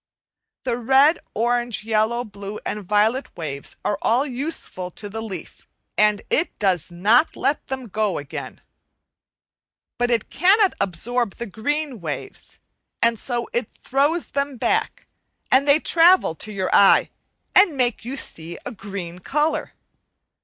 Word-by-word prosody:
The 245 Hz, -2 st, -1 dB
red, 270 Hz, +6 st, +4 dB, 0.2 s
orange, 240 Hz, 0 st, 0 dB
yellow, 220 Hz, +2 st, +1 dB
blue, 205 Hz, -2 st, -8 dB
and 210 Hz, -, -3 dB
violet 215 Hz, +7 st, +2 dB
waves 140 Hz, -4 st, -6 dB
are 205 Hz, -, 0 dB
all 245 Hz, +5 st, +2 dB
useful 260 Hz, -, -4 dB
to 205 Hz, +3 st, -8 dB
the 225 Hz, +2 st, -5 dB
leaf, 195 Hz, -6 st, -8 dB, 0.3 s
and 210 Hz, -1 st, +3 dB
it 345 Hz, -, +1 dB
does 185 Hz, -5 st, 0 dB
not 215 Hz, -, +3 dB
let 290 Hz, -, -1 dB
them 265 Hz, -2 st, -4 dB
go 210 Hz, -2 st, -1 dB
again. 140 Hz, -1 st, -7 dB, 1.4 s
But 245 Hz, 0 st, +2 dB
it 235 Hz, -3 st, 0 dB
cannot 385 Hz, +4 st, +4 dB
absorb 205 Hz, +5 st, -1 dB
the 235 Hz, -, -5 dB
green 270 Hz, +5 st, -3 dB
waves, 160 Hz, -, -6 dB, 0.4 s
and 230 Hz, -1 st, +2 dB
so 240 Hz, 0 st, -2 dB
it 240 Hz, -2 st, -1 dB
throws 290 Hz, +6 st, 0 dB
them 280 Hz, -1 st, -1 dB
back, -, -, -1 dB, 0.5 s
and 275 Hz, +2 st, +4 dB
they 285 Hz, +2 st, +6 dB
travel 345 Hz, -, +4 dB
to 215 Hz, +6 st, -7 dB
your 190 Hz, -2 st, -2 dB
eye 200 Hz, -, +6 dB, 0.4 s
and 365 Hz, -8 st, +5 dB
make 245 Hz, -4 st, 0 dB
you 260 Hz, +4 st, -5 dB
see 165 Hz, -7 st, -5 dB
a -, -, -4 dB
green 195 Hz, -5 st, -7 dB
colour. 300 Hz, -, -1 dB
235 Hz, 140 wpm, -22 LUFS, 200-275 Hz, 1.4 s, they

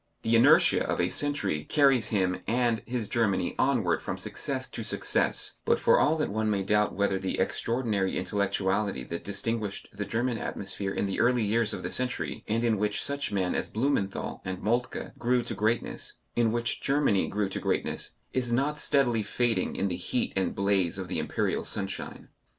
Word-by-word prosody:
The 115 Hz, +1 st, +2 dB
inertia 115 Hz, -, +6 dB
of -, -, -2 dB
a -, -, +2 dB
century 105 Hz, -, 0 dB
carries 135 Hz, -, +3 dB
him 95 Hz, -3 st, 0 dB
and 120 Hz, -1 st, +1 dB
his 120 Hz, -3 st, -2 dB
Germany 110 Hz, -7 st, 0 dB
onward 120 Hz, -11 st, +2 dB
from -, -, -4 dB
success -, -, -4 dB
to -, -, -6 dB
success, -, -, +1 dB
but -, -, +2 dB
for -, -, +4 dB
all 155 Hz, +2 st, +3 dB
that 150 Hz, -, -1 dB
one 110 Hz, +1 st, 0 dB
may 100 Hz, -2 st, 0 dB
doubt 105 Hz, +1 st, +1 dB
whether 100 Hz, -1 st, +1 dB
the 95 Hz, 0 st, -2 dB
extraordinary 110 Hz, -5 st, 0 dB
intellectuality 100 Hz, -4 st, -1 dB
that 85 Hz, +6 st, -5 dB
distinguished 105 Hz, +1 st, -3 dB
the 100 Hz, 0 st, -4 dB
German 115 Hz, +4 st, -1 dB
atmosphere 95 Hz, 0 st, -3 dB
in -, -, -1 dB
the 95 Hz, -, -2 dB
early 125 Hz, -1 st, +3 dB
years 110 Hz, +1 st, +1 dB
of -, -, -5 dB
the -, -, -3 dB
century, 125 Hz, 0 st, -2 dB
and 115 Hz, +2 st, 0 dB
in 115 Hz, -3 st, +1 dB
which 105 Hz, 0 st, 0 dB
such 140 Hz, 0 st, +1 dB
men 95 Hz, -3 st, 0 dB
as -, -, -1 dB
Blumenthal 110 Hz, -5 st, -1 dB
and 95 Hz, 0 st, -5 dB
Moltke 120 Hz, +4 st, -1 dB
grew 125 Hz, 0 st, +1 dB
to -, -, -3 dB
greatness, 110 Hz, +3 st, -1 dB, 0.2 s
in 115 Hz, -2 st, +2 dB
which 120 Hz, 0 st, -1 dB
Germany 140 Hz, -8 st, +2 dB
grew 105 Hz, 0 st, -1 dB
to -, -, -4 dB
greatness, -, -, -1 dB, 0.2 s
is 125 Hz, -2 st, -1 dB
not 140 Hz, +5 st, +1 dB
steadily 125 Hz, -6 st, +3 dB
fading 115 Hz, -2 st, 0 dB
in 100 Hz, -, 0 dB
the 90 Hz, -, -2 dB
heat 95 Hz, +7 st, -1 dB
and 95 Hz, -1 st, 0 dB
blaze 100 Hz, -3 st, +2 dB
of 95 Hz, -2 st, -5 dB
the -, -, -1 dB
Imperial -, -, -1 dB
sunshine. 95 Hz, -1 st, -4 dB
110 Hz, 185 wpm, -28 LUFS, 100-120 Hz, 0.2 s, inertia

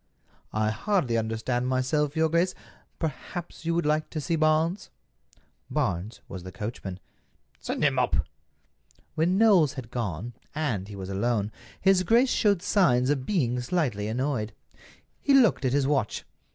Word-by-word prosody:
"I 110 Hz, 0 st, +2 dB
hardly 175 Hz, -, 0 dB
understand 115 Hz, +3 st, -1 dB
myself, 135 Hz, +4 st, 0 dB
your 160 Hz, 0 st, +3 dB
grace. 170 Hz, +3 st, +1 dB, 0.4 s
Perhaps 165 Hz, +3 st, -5 dB
you 165 Hz, -, +1 dB
would 170 Hz, -, +1 dB
like 150 Hz, +1 st, +1 dB
to 155 Hz, -, -4 dB
see 165 Hz, +3 st, -1 dB
Barnes." 160 Hz, +4 st, +1 dB, 0.8 s
Barnes 90 Hz, +6 st, -2 dB
was 95 Hz, -, -7 dB
the 95 Hz, +1 st, -8 dB
coachman. 95 Hz, -1 st, -6 dB, 0.6 s
"Send -, -, -3 dB
him -, -, +3 dB
up." -, -, +2 dB, 1.0 s
When 175 Hz, +4 st, +2 dB
Knowles 195 Hz, -, +5 dB
had 120 Hz, -4 st, -8 dB
gone, 115 Hz, -1 st, -3 dB, 0.2 s
and 120 Hz, -12 st, -1 dB
he 105 Hz, -, -8 dB
was 95 Hz, -1 st, -6 dB
alone, 105 Hz, +1 st, 0 dB, 0.3 s
his 190 Hz, -1 st, +4 dB
grace 235 Hz, +7 st, +4 dB
showed 200 Hz, -5 st, +2 dB
signs 130 Hz, -, +3 dB
of 135 Hz, -3 st, -2 dB
being 125 Hz, -, +1 dB
slightly 125 Hz, -, -1 dB
annoyed. 115 Hz, -2 st, -1 dB, 0.7 s
He 280 Hz, -, +4 dB
looked 235 Hz, -, +4 dB
at 130 Hz, -, +2 dB
his 140 Hz, -1 st, +2 dB
watch. 135 Hz, -6 st, 0 dB
135 Hz, 150 wpm, -27 LUFS, 110-170 Hz, 1.0 s, Knowles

